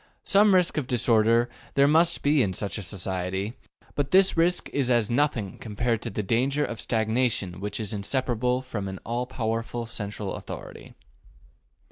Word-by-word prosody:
Some 200 0 +5
risk 180 -3 +2
of 140 -5 -1
disorder 115 -1 +3 0.3
there 140 0 +5
must 165 +3 +3
be 145 0 +4
in 95 -5 0
such 100 +3 -3
a - - -4
society, 95 +2 -3 0.4
but 145 -1 -2
this 190 0 +5
risk 175 +2 +2
is 135 -3 0
as 120 -3 +2
nothing 120 -7 0
compared 115 +1 -2
to - - -4
the 105 - -3
danger 130 +8 +1
of 115 - -6
stagnation 110 -5 0
which 105 +2 -3
is 105 -2 -2
inseparable 125 +3 -1
from 105 -6 -5
an 95 0 -5
all 120 +2 -2
powerful 115 -1 -3
central 105 -3 -5
authority. - - -9
115 Hz, 160 wpm, -26 LUFS, 105-135 Hz, 0.4 s, Some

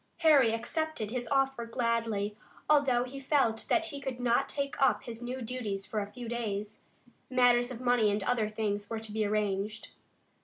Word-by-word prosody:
Harry 290 -8 +6
accepted 235 0 -2
his 245 -1 -2
offer 270 -1 +1
gladly, 230 -3 -1 0.3
although 275 -5 +4
he 265 +2 -7
felt 265 -5 +1
that 335 -1 +3
he 280 -2 -6
could 265 -2 -4
not 245 +2 +2
take 280 0 -3
up 270 - +3
his 235 -1 -7
new 250 +1 -4
duties 220 -5 -3
for 215 - -2
a 205 0 -5
few 240 +2 -7
days. 215 -3 -3 0.5
Matters 245 -1 +4
of 250 -3 -6
money 245 -4 +3
and 205 0 0
other 220 -1 +1
things 205 -1 -2
were 225 - -3
to 220 -1 -7
be 215 0 0
arranged. 210 0 -1
235 Hz, 180 wpm, -30 LUFS, 215-260 Hz, 0.5 s, Harry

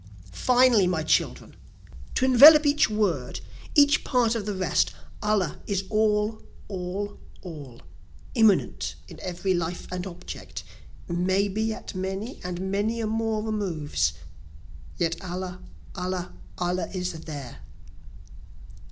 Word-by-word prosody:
"Finally 245 - +4
my 170 -3 0
children, 155 - 0 0.6
to 260 - +2
envelop 295 +4 +9
each 290 -3 +4
word, 190 -12 -1 0.4
each 290 0 +5
part 240 -4 +2
of 215 -3 -3
the 205 - -1
rest, 185 -2 +1 0.3
Allah 210 -6 0
is 195 -2 0
all, 215 0 +1 0.3
all, 195 +1 -4 0.2
all 145 -9 -9 0.5
immanent 220 -3 +2
in - - -12
every 185 +1 -1
life 175 0 -2
and 180 +1 -3
object, 180 0 -8 0.4
May 185 +3 +1
be 220 +3 -1
at - - -7
many 190 +6 -4
and 180 +1 -4
many 215 +4 0
a 225 - -1
more 220 0 -1
removes 160 - -1 0.8
yet 165 +2 -1
Allah, 180 0 -5 0.3
Allah, 180 0 -4 0.2
Allah 180 +1 -1
is 180 -1 -2
there. 150 - -8
190 Hz, 120 wpm, -26 LUFS, 180-220 Hz, 0.8 s, envelop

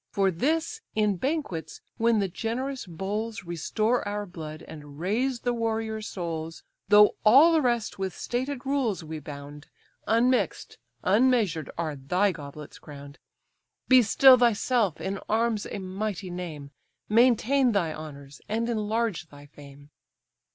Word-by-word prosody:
For 195 -1 +1
this, 320 - -1
in 210 -3 +1
banquets, 265 - -3 0.2
when 230 -1 +3
the 200 -2 +1
generous 240 +7 -4
bowls 205 +6 -4
Restore 215 +8 -1
our 205 0 -3
blood, 160 -4 -8
and 145 -2 -11
raise 235 +8 -1
the 245 - 0
warriors' 220 -2 -2
souls, 165 -3 -5 0.3
Though 210 0 +6
all 275 +10 +7
the 320 - +4
rest 240 -6 -1
with 190 -2 -3
stated 255 +2 -3
rules 265 -10 0
we 160 0 -6
bound, 145 0 -10 0.4
Unmix'd, 245 +3 +1 0.3
unmeasured, 210 - +2
are 160 -3 -2
thy 180 +9 +1
goblets 150 -2 -10
crown'd. 140 -1 -12 0.7
Be 255 -1 +7
still 255 +3 +6
thyself, 235 - +2
in 190 +4 -3
arms 225 -1 0
a - - -5
mighty 190 -1 -4
name; 160 -6 -7 0.4
Maintain 245 +3 +3
thy 175 -7 0
honours, 145 -3 -10
and 230 +2 -1
enlarge 220 -4 -1
thy 145 0 -14
fame." 145 0 -15
205 Hz, 135 wpm, -27 LUFS, 160-235 Hz, 0.7 s, all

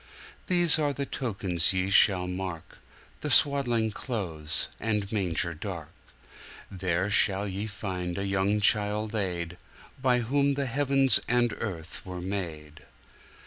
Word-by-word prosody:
These 175 -3 +5
are 145 -2 +1
the 140 0 -3
tokens 95 -10 +1
ye 95 +1 -1
shall 95 -3 +5
mark, 90 -3 -6 0.4
The - - -4
swaddling 120 -6 +3
clothes 85 - -1
and 105 -3 -2
manger 85 -5 0
dark; 85 -1 -7 0.8
There 95 +1 -1
shall 100 -1 +4
ye 100 +2 -4
find 95 -4 -5
the 100 - -2
young 100 +2 0
child 105 +1 +2
laid, 90 -5 -3 0.4
By 125 -2 +2
whom 140 +4 +1
the 140 0 -2
heavens 135 +1 +2
and 120 -1 +1
earth 85 -6 -6
were 90 -1 -7
made. 80 -5 -6
100 Hz, 130 wpm, -27 LUFS, 90-120 Hz, 0.8 s, These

